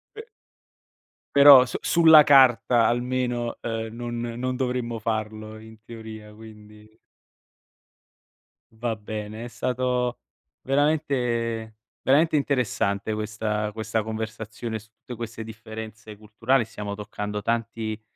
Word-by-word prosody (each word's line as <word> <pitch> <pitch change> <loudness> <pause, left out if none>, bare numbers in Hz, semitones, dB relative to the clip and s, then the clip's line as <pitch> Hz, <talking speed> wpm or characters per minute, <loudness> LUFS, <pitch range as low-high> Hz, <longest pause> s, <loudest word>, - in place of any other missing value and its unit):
Pe 440 - -7 1.1
Però 140 -2 +9
su 125 - -5
sulla 160 -3 +7
carta 125 -4 +5
almeno, 120 0 -1
ehm, 115 -1 -3
non 120 0 -5
non 120 +2 -3
dovremmo 125 -2 -2
farlo, 110 -1 -4
in 110 0 -14
teoria, 110 -2 -10
quindi. 105 0 -15 1.8
Va 115 0 -2
bene, 105 +1 -6
è - - -6
stato 125 +1 -1 0.4
veramente 125 -6 0 0.2
veramente 155 +4 +3
interessante 110 -7 0
questa 105 0 -2
questa 110 +1 -2
conversazione 110 +1 -5
su 110 +1 -18
tutte 135 -2 -9
queste 115 -1 -7
differenze 110 -1 -9
culturali, 115 +4 0
stiamo 105 -2 -6
toccando 105 0 -5
tanti 115 -1 -3
115 Hz, 105 wpm, -25 LUFS, 110-125 Hz, 1.8 s, Però